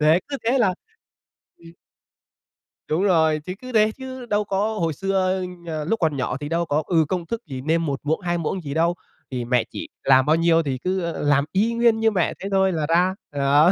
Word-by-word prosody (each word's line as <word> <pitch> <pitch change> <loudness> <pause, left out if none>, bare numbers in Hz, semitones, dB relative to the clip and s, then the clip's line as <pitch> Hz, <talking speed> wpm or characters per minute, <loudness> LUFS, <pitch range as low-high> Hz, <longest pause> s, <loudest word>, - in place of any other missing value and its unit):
Đấy, 155 +4 +4
cứ 280 - -3
thế 250 +4 +2
là 195 -6 +3 0.8
Ừm. 165 0 -14 1.2
Đúng 165 +5 +1
rồi, 160 -5 +3
chứ 185 - -4
cứ 255 0 -8
thế 215 -1 +4
chứ 260 -1 -7
đâu 210 -2 0
có 210 +2 -1
hồi 165 -2 0
xưa, 190 +2 0 0.3
ờ, 155 -2 -3
lúc 225 +8 0
còn 155 -5 +1
nhỏ 130 0 -2
thì 145 +1 -6
đâu 170 +1 0
có, 150 0 0
ừ, 165 -3 +3
công 180 -2 -2
thức 230 +6 -4
gì 130 -4 -6
nêm 165 +3 +1
1 140 -3 -2
muỗng, 155 +2 0
2 175 -1 -1
muỗng 170 +3 -2
gì 140 -3 -5
đâu, 170 +3 +2 0.4
thì 125 -2 -3
mẹ 125 -1 +2
chỉ - - -7 0.2
làm 130 -1 +5
bao 155 - +4
nhiêu 165 0 +3
thì 135 -3 -2
cứ, 185 +7 -2
ơ, 170 -1 -3
làm 145 -1 +3
y 215 +6 +1
nguyên 230 -1 +3
như 225 0 +3
mẹ 180 -4 0
thế 195 - -5
thôi 190 -1 +3
là 155 -3 -1
ra. 180 +3 +3 0.2
Đó. 145 +4 +4
170 Hz, 230 wpm, -23 LUFS, 150-195 Hz, 1.2 s, làm